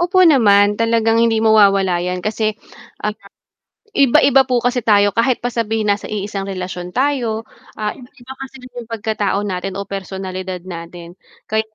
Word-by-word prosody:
Opo 360 +1 +4
naman, 205 -8 +4
talagang 230 0 +2
hindi 230 -1 +3
mawawala 195 -5 +4
yan 180 +1 -3
kasi, 215 0 -1 0.5
ah, 210 - 0 0.8
Iba-iba 270 0 +5
po 250 - +2
kasi 245 0 +1
tayo 205 -2 +4
kahit 235 +4 +1
pa 245 - -1
sabihin 225 -2 -1
na 200 - -2
iisang 200 -1 -4
relasyon 180 -2 -5
tayo, 245 -5 0 0.3
ah, 210 -1 -2
iba-iba 250 0 -13
kasi 270 0 -8 0.2
yung 240 -2 -8
pagkatao 215 -3 -1
natin 190 -1 -4
o 200 - -4
personalidad 190 -1 -5
natin. 170 -1 -9 0.4
Kay 220 0 +1
215 Hz, 150 wpm, -18 LUFS, 195-235 Hz, 0.8 s, Iba-iba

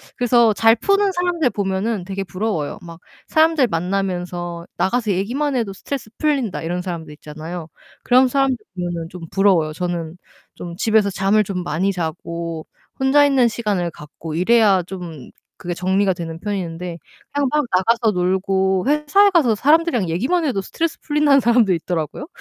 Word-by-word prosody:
그래서 235 -2 +4
잘 225 +2 +4
푸는 395 - +2
사람들 350 -5 0
보면은 195 -1 -2
되게 195 +1 -4
부러워요. 185 -4 -3
막 165 -1 -11 0.3
사람들 315 -4 +3
만나면서 175 -1 -3
"나가서 220 +1 0
얘기만 255 +9 -1
해도 215 -5 -2
스트레스 235 +3 -6
풀린다." 280 -9 0
이런 175 +2 -3
사람들 170 -4 -6
있잖아요. 155 +3 -8 0.4
그런 255 +1 +4
사람들 270 0 +2 0.2
보면은 175 -2 -4
좀 180 -2 -10
부러워요. 185 -6 +2
저는 170 -1 -4 0.4
좀 170 -1 -8
집에서 220 -1 +2
잠을 195 +2 +2
좀 185 -2 -4
많이 175 +4 0
자고 170 -2 -5 0.3
혼자 270 +2 +4
있는 265 -4 +3
시간을 205 -7 -2
갖고 155 +1 -9
이래야 195 0 +4
좀 170 -7 -8 0.3
그게 175 0 -4
정리가 190 +2 +1
되는 165 -2 -7
편인데 180 -4 -4 0.4
그냥 285 -2 +1
막 300 -2 +1
나가서 230 +4 +2
놀고 190 +1 +1
회사에 300 +8 +4
가서 295 -11 +3
사람들이랑 290 - +2
얘기만 275 - 0
해도 240 -9 0
스트레스 330 - -3
풀린다는 295 -2 +3
사람도 235 -5 +3
있더라고요. 165 - -3
195 Hz, 370 characters per minute, -20 LUFS, 175-250 Hz, 0.4 s, 그래서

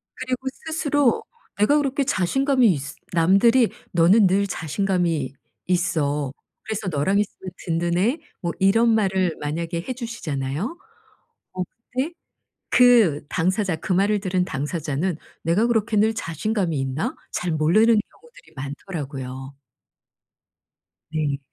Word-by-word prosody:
그리고 260 0 -4 0.2
스스로 290 -5 +1 0.3
내가 215 +9 +4
그렇게 280 -1 +1
자신감이 265 +3 +2
있으 145 -1 -4 0.2
남들이 200 +8 +4 0.2
"너는 185 +5 +5
늘 195 +2 +2
자신감이 165 - -1 0.3
있어. 150 -6 0 0.3
그래서 215 -2 -4
너랑 180 +6 +1
있으면 190 -2 -4
든든해." 175 - +1 0.2
뭐 170 - -1
이런 225 +5 +4
말을 190 -5 +1
만약에 165 +3 -3
해 255 - -1
주시잖아요? 195 - -4 0.8
어 185 0 -3 0.3
근데 265 +7 -1 0.6
그 225 -13 +5
당사자, 185 +1 0
그 160 +3 -2
말을 200 +3 +2
들은 185 -2 0
당사자는 150 +3 -2 0.3
'내가 185 +8 +2
그렇게 225 -2 +1
늘 220 +2 +3
자신감이 180 -2 -2
있나?' 135 +3 -2 0.2
잘 175 - -2
모르는 195 +9 +4
경우들이 480 - -20
많더라고요. 135 -2 -6 1.6
네. 150 -3 -1
185 Hz, 270 characters per minute, -23 LUFS, 155-225 Hz, 1.6 s, 너는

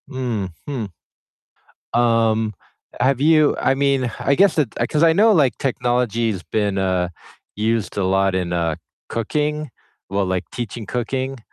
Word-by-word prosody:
Mhm. 115 - -4 1.0
Um, 115 -2 +2 0.5
have 130 +1 +2
you 155 0 +4
I - - +2
mean, 135 -3 +1
I 140 - +2
guess 195 +2 +4
it 140 -8 +1 0.2
'cause 155 +1 +1
I 165 -1 +6
know 215 +6 +5
like 145 - +3
technology's 120 -6 0
been, 105 -2 -1
uh, 95 -2 0 0.5
used 110 0 -1
a 100 - +1
lot 95 0 +2
in, 90 -2 -1
uh, 85 -2 0 0.3
cooking, 150 +6 -2 0.4
well, 100 0 0
like 90 -1 -1
teaching 120 -1 -5
cooking, 130 +4 -3
120 Hz, 135 wpm, -21 LUFS, 100-135 Hz, 1.0 s, I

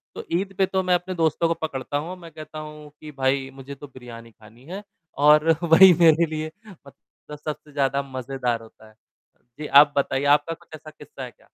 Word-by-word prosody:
तो - - -6
ईद 195 +1 -4
पे 190 - +3
तो 190 0 -1
मैं 180 -1 +2
अपने 185 +1 -3
दोस्तों 165 0 +1
को 165 - +1
पकड़ता 140 0 -4
हूँ, 170 +5 -5
मैं 170 -2 -13
कहता 155 0 -10
हूँ 150 -1 -10
कि, 155 - -10
"भाई 135 -1 -1
मुझे 135 +1 -10
तो 145 +1 -11
बिरयानी 120 -3 -12
खानी 110 +3 -19
है" 200 +3 -7 0.4
और 150 +2 +5
वही 175 +3 +8
मेरे 165 0 +5
लिए 155 0 -5 0.2
मतलब 150 -2 -15
सबसे 150 0 -7
ज़्यादा 140 -1 0
मज़ेदार 130 -3 -3
होता 110 -1 -17
है। 110 - -24 0.6
जी, 150 - -5
आप 145 +1 +6
बताइए 140 0 0
आपका 165 +3 -7
कुछ - - -18
ऐसा 155 0 -12
किस्सा 150 -3 -12
है 125 - -8
क्या? - - -28
150 Hz, 205 wpm, -23 LUFS, 135-165 Hz, 0.6 s, वही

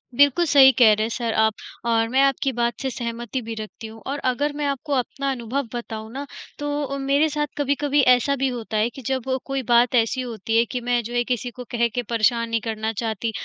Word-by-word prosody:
बिल्कुल, 285 +6 +4
सही 280 -3 +7
कह 230 -3 +8
रहे 215 +1 0
हैं - - -3
सर 235 -1 -2
आप 220 0 +3 0.3
और 225 -1 +2
मैं 260 +3 +3
आपकी 275 0 +2
बात 235 0 0
से 265 - -1
सहमति 240 0 -4
भी 225 -1 -6
रखती 220 +1 -8
हूँ, 225 0 -12
और 280 +2 -2
अगर 290 +4 -1
मैं 295 0 -2
आपको 280 +1 -2
अपना 275 +1 -1
अनुभव 255 +2 -3
बताऊँ 220 -2 -6
ना, 275 +2 -5 0.3
तो 290 0 -2
अ, 275 0 -3
मेरे 280 +3 +2
साथ 295 0 -1
कभी-कभी 285 0 +1
ऐसा 250 +3 +1
भी 270 0 0
होता 230 -4 -3
है 215 +2 +2
कि 265 - -11
जब 265 -1 -2 0.2
कोई 270 -1 -2
बात 240 +1 +5
ऐसी 235 +2 +2
होती 225 -2 -2
है, 230 - +4
कि 245 +1 -4
मैं 245 0 +1
जो 235 +2 -7
है 240 0 +2
किसी 245 0 -2
को 250 +1 -9
कह 235 0 +2
के 245 - +1
परेशान 230 0 +2
नहीं 230 -1 0
करना 220 0 -3
चाहती 225 0 -2
245 Hz, 230 wpm, -23 LUFS, 230-275 Hz, 0.3 s, कह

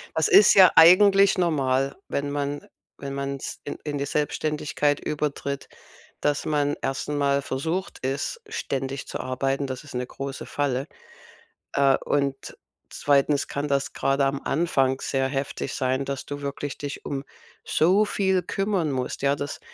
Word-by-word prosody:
Das - - +2
ist 400 0 +7
ja 185 -2 +8
eigentlich 195 +4 +7
normal, 135 -6 +1
wenn 140 0 -2
man 145 0 -3 0.3
wenn 140 0 -6
man's 140 0 -4
in 145 - -5
in 145 -2 -3
die 140 - -2
Selbstständigkeit 150 0 -1
übertritt, 145 -2 -3 0.5
dass 145 -1 0
man 145 -1 +1
erst 135 0 -2
mal 140 -1 +1
versucht 160 +9 -3
ist, 140 - -2
ständig 135 - -4
zu - - -5
arbeiten. 135 +2 -1
Das 130 +1 -6
ist 145 - -12
'ne 125 0 -2
große 135 0 -6
Falle. 140 -2 -1 0.9
Äh, 135 -1 +4
und 140 -1 -1 0.3
2. 145 0 +2
kann 145 +1 -3
das 140 0 0
grade 135 0 +1
am 135 0 -1
Anfang 135 -4 +1
sehr 135 -1 0
heftig 135 -1 -3
sein, 130 +1 0
dass 140 -1 -4
du 145 0 -6
wirklich 140 0 -4
dich 145 -1 -6
um 135 -1 -3 0.4
so 185 +7 +3
viel 190 -2 +1
kümmern 195 -5 -1
musst, 130 -2 -3
ja? 140 0 +2
Das 145 - -5
140 Hz, 150 wpm, -25 LUFS, 135-150 Hz, 0.9 s, ja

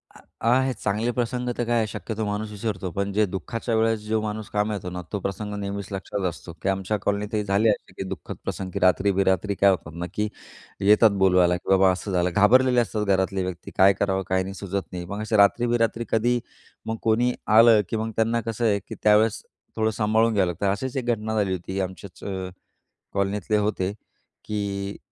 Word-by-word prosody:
आ - - -14 0.3
आहेत 130 +1 +2
चांगले 105 +4 -1
प्रसंग 125 +1 -2
तर 120 - 0
काय 120 +1 +1
आहे 110 -1 +1
शक्यतो 110 +1 -4
माणूस 105 +1 -3
विसरतो, 100 -3 -3
पण 100 +3 -2
जे 105 +1 +3
दुःखाच्या 110 +5 -3
वेळेस 110 0 +2
जो 110 0 +1
माणूस 105 0 -4
कामी 105 +1 0
येतो 95 -3 -4
ना 90 0 -5
तो 105 - 0
प्रसंग 105 +2 -4
नेहमीच 100 0 -4
लक्षात 95 0 -4
असतो, 85 0 -10
की 95 - 0
आमच्या 95 +2 -1
कॉलनीतही 105 +2 -1
झाले 100 +3 +2
असे, 105 - -2
की - - -3
दुःखद 95 - -6
प्रसंग 95 -1 -4
की 100 - -2
रात्री 95 +2 +3
बेरात्री 95 +1 +1
काय 100 +1 +5
होतात 85 -4 -1
ना, 85 +1 -4
की 105 0 0 0.5
येतात 105 +2 +5
बोलवायला, 90 -2 +4
की - - -10
बाबा 95 0 +5
असं 95 +2 -4
झालं. 90 -1 +2
घाबरलेले 125 +4 +5
असतात 110 -2 -2
घरातले 95 -1 +1
व्यक्ती. 90 -2 -6
काय 95 +1 +7
करावं 95 -1 0
काय 95 0 +2
नाही 95 +1 -6
सुचत 100 0 -4
नाही. 90 -1 -5
मग 100 +4 -5
असे 110 0 0
रात्री 100 +4 +4
बेरात्री 120 0 0
कधी 120 +2 +2 0.5
मग 110 0 -3
कोणी 120 +3 +2
आलं, 110 0 +7
की 115 - -1
मग 110 +1 -3
त्यांना 115 +1 +1
कसं 115 +1 -3
आहे, 105 -2 +3
की 100 - -10
त्यावेळेस 105 +1 +4 0.3
थोडं 110 0 +1
सांभाळून 110 +1 +2
घ्यावं 100 -3 +2
लागतं. 90 +3 -3
अशीच 130 +6 -3
एक 130 - -2
घटना 110 -2 -1
झाली 100 -3 +1
होती. 95 +2 -4
आमच्याच 95 0 -7
अ, 95 -2 -4 0.6
कॉलनीतले 100 +1 0
होते, 105 -2 -1 0.5
की 100 -1 -3
105 Hz, 200 wpm, -24 LUFS, 95-110 Hz, 0.6 s, काय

